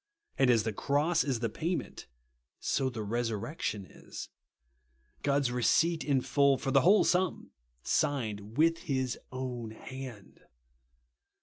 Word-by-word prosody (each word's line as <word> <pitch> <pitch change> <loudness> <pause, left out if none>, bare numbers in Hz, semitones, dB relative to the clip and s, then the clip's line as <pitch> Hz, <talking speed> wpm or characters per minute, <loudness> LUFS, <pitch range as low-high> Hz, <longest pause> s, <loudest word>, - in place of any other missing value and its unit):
And 135 -2 +3
as 115 -3 +4
the 110 -1 -2
cross 150 - +1
is 130 -5 -1
the 115 - +1
payment, 165 - -4 0.5
so 135 -1 0
the 115 -4 -5
resurrection 110 - -2
is. - - -10 0.9
God's 140 -3 +1
receipt 155 +8 +2
in 140 -3 +2
full, 135 +2 +3
for 135 - -2
the 135 0 +5
whole 200 +7 +6
sum, 180 -1 0 0.3
signed 110 -7 -1
with 165 +2 +4
his 130 -6 -2
own 125 -3 -4
hand. 125 -1 -9
130 Hz, 125 wpm, -31 LUFS, 115-145 Hz, 0.9 s, whole